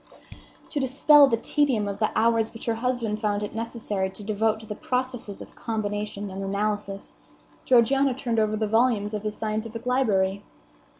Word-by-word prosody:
To 295 - -1
dispel 280 +2 +6
the 230 - +1
tedium 245 -4 +1
of 200 0 -4
the 215 - +2
hours 225 0 +2
which 225 - -8
her 230 - +1
husband 230 -2 -2
found 210 -1 0
it 205 - -5
necessary 220 -4 -2
to 195 +2 -10
devote 220 +1 0
to - - -11
the 210 - -5
processes 250 -3 -3
of - - -17
combination 205 -2 -4
and 195 +1 -5
analysis, 200 0 -3 0.5
Georgiana 260 +2 +4
turned 235 -3 -1
over 215 0 +1
the 215 - 0
volumes 225 -1 +2
of 210 - -2
his 215 0 -4
scientific 220 +2 -4
library. 200 -7 +1
220 Hz, 170 wpm, -25 LUFS, 205-240 Hz, 0.5 s, dispel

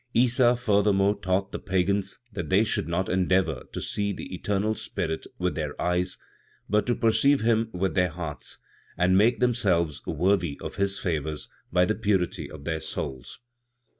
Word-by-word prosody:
Issa 120 +1 +4
furthermore 105 -4 +3
taught 95 +1 0
the - - -4
Pagans 95 +1 0 0.2
that 90 -6 -4
they 95 +3 +4
should 105 - -1
not 90 +3 -1
endeavor 90 -6 +1
to - - -4
see 100 0 -1
the 95 - -7
eternal 100 +3 0
Spirit 85 -7 -4
with 90 -2 0
their 75 -1 -4
eyes; 90 +1 0 0.5
but 105 +1 +1
to 120 - +2
perceive 115 +5 +3
Him 115 0 +2
with 90 -1 -1
their 90 +1 +2
hearts, 80 -2 -6 0.4
and 90 +1 +3
make 110 +5 +4
themselves 95 - +1
worthy 90 -2 +1
of - - -7
His 100 0 +1
favors 80 -4 -3 0.2
by 90 0 +4
the 110 - +1
purity 100 -5 -1
of 75 -2 -10
their 80 -1 -1
souls. 65 - -6
95 Hz, 165 wpm, -26 LUFS, 85-105 Hz, 0.5 s, Issa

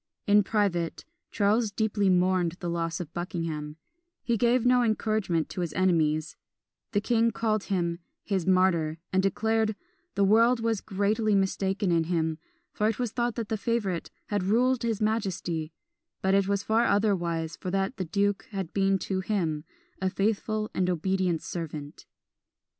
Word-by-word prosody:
In 205 0 +5
private, 195 -5 -1 0.2
Charles 210 +2 +2
deeply 205 -1 +1
mourned 180 -2 +2
the 175 -1 -5
loss 165 -1 -2
of 170 -3 -7
Buckingham; 165 -4 -4 0.5
he 235 - +1
gave 240 +2 +2
no 250 0 +5
encouragement 215 -7 0
to 180 - -4
his 170 -3 -3
enemies: 160 -4 +1 0.6
the 205 - +2
king 230 +2 +2
called 220 -2 -1
him 170 -3 -1 0.2
"his 190 -4 -1
martyr," 180 -4 +3 0.2
and 190 - +4
declared 220 +3 +1 0.4
"the 200 - +2
world 230 +5 +5
was 225 -3 0
greatly 210 +2 +1
mistaken 195 0 0
in 165 -1 +2
him; 160 -2 -1 0.3
for 210 - 0
it 220 - -2
was 245 -3 -2
thought 240 0 -1
that 230 -3 -4
the 220 - 0
favourite 205 -6 -1 0.2
had 205 -2 0
ruled 240 +6 +2
his 225 -2 -1
majesty, 190 -7 -1 0.5
but 190 0 +2
it 195 -1 +3
was 200 0 0
far 225 +2 +2
otherwise; 175 -6 0
for 185 - -6
that 195 +5 -1
the 185 - -2
duke 200 +4 0
had 195 -5 -5
been 195 0 +2
to 190 0 -2
him 175 -6 -1 0.4
a 190 - +1
faithful 215 +2 -1
and 185 -1 0
an - - +2
obedient 180 -1 0
servant." 150 -4 -6
195 Hz, 160 wpm, -27 LUFS, 175-215 Hz, 0.6 s, In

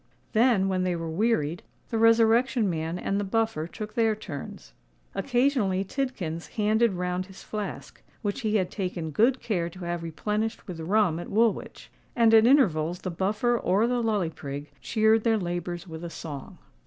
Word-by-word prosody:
Then, 225 -4 +4
when 185 -1 0
they 180 -1 0
were 165 -1 -4
wearied, 175 -4 0 0.3
the 225 - 0
Resurrection 230 +1 +4
Man 165 -1 -2
and 195 +2 -1
the - - -1
Buffer 210 -6 0
took 210 +3 -7
their 225 -2 +2
turns. 145 - -8 0.4
Occasionally 245 -7 +1
Tidkins 195 - -3
handed 220 +1 +3
round 180 0 -2
his 190 -1 -13
flask, 210 -2 -6 0.2
which 205 +5 -2
he 220 -2 0
had 185 -4 +1
taken 180 -5 -3
good 240 - +3
care 175 -6 -1
to 185 +2 -12
have 170 0 -2
replenished 210 +7 -3
with 175 -4 -6
rum 180 0 +2
at 175 - -7
Woolwich; 225 +1 0 0.2
and 230 -2 +5
at 225 +1 +7
intervals 175 - +3
the 185 - -3
Buffer 210 +7 +1
or 205 -1 +2
the 245 0 +1
Lully 210 -7 0
Prig 145 -1 -7
cheered 220 0 +3
their 225 -2 +3
labours 175 -1 -4
with 160 0 -8
a 170 - -4
song. 150 -4 -8
200 Hz, 170 wpm, -27 LUFS, 170-225 Hz, 0.4 s, at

